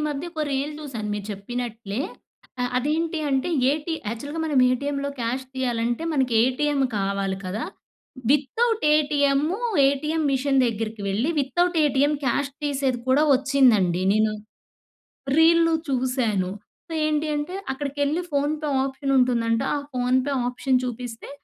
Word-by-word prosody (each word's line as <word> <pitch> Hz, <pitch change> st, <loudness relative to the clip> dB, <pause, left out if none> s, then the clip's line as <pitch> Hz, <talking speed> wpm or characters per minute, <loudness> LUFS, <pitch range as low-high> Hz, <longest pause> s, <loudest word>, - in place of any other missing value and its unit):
మధ్య 295 Hz, +3 st, -4 dB
ఒక 315 Hz, -2 st, -2 dB
రీల్ 275 Hz, +3 st, -1 dB
చూశాను 240 Hz, -8 st, -5 dB
మీరు 205 Hz, -1 st, -5 dB
చెప్పినట్లే, 225 Hz, +1 st, -5 dB, 0.6 s
ఆహ్, 245 Hz, -, -1 dB
అదేంటి 315 Hz, +5 st, 0 dB
అంటే 270 Hz, +4 st, +1 dB, 0.2 s
ఏటీ 310 Hz, +3 st, -2 dB
యాక్చువల్‌గా 285 Hz, +8 st, -5 dB
మనం 300 Hz, -4 st, +1 dB
ఏటీఎంలో 280 Hz, +2 st, -1 dB
క్యాష్ 245 Hz, +3 st, -2 dB
తీయాలంటే, 240 Hz, 0 st, -1 dB
మనకి 265 Hz, -4 st, +1 dB
ఏటీఎం 280 Hz, +3 st, +1 dB, 0.2 s
కావాలి 195 Hz, -1 st, -1 dB
కదా! 195 Hz, +5 st, -3 dB, 0.7 s
వితౌట్ 425 Hz, -, +1 dB
ఏటీఎంమ్ము, 295 Hz, +4 st, +1 dB, 0.3 s
ఏటీఎం 300 Hz, +4 st, 0 dB
మిషన్ 270 Hz, 0 st, +2 dB
దగ్గరికి 220 Hz, -1 st, -3 dB
వెళ్ళి, 220 Hz, +10 st, 0 dB
వితౌట్ 350 Hz, +6 st, 0 dB
ఏటీఎం 285 Hz, +1 st, +2 dB
క్యాష్ 270 Hz, +3 st, 0 dB
తీసేది 270 Hz, -4 st, 0 dB
కూడా 265 Hz, +3 st, +4 dB
వచ్చిందండి. 250 Hz, -10 st, +3 dB
నేను 215 Hz, 0 st, +2 dB, 1.1 s
రీల్లు 330 Hz, 0 st, +5 dB, 0.2 s
చూసాను. 250 Hz, -8 st, 0 dB, 0.5 s
ఏంటి 305 Hz, 0 st, 0 dB
అంటే, 295 Hz, +5 st, -4 dB, 0.2 s
అక్కడికెళ్లి 285 Hz, +4 st, -1 dB
ఫోన్ 285 Hz, +1 st, +1 dB
పే -, -, -2 dB, 0.2 s
ఆప్షన్ 275 Hz, 0 st, -2 dB
ఉంటుందంట, 230 Hz, -2 st, +2 dB, 0.2 s
ఆ -, -, -1 dB
ఫోన్ 250 Hz, 0 st, +1 dB, 0.3 s
ఆప్షన్ 255 Hz, +1 st, +1 dB
చూపిస్తే 245 Hz, -1 st, -6 dB
270 Hz, 125 wpm, -24 LUFS, 235-295 Hz, 1.1 s, రీల్లు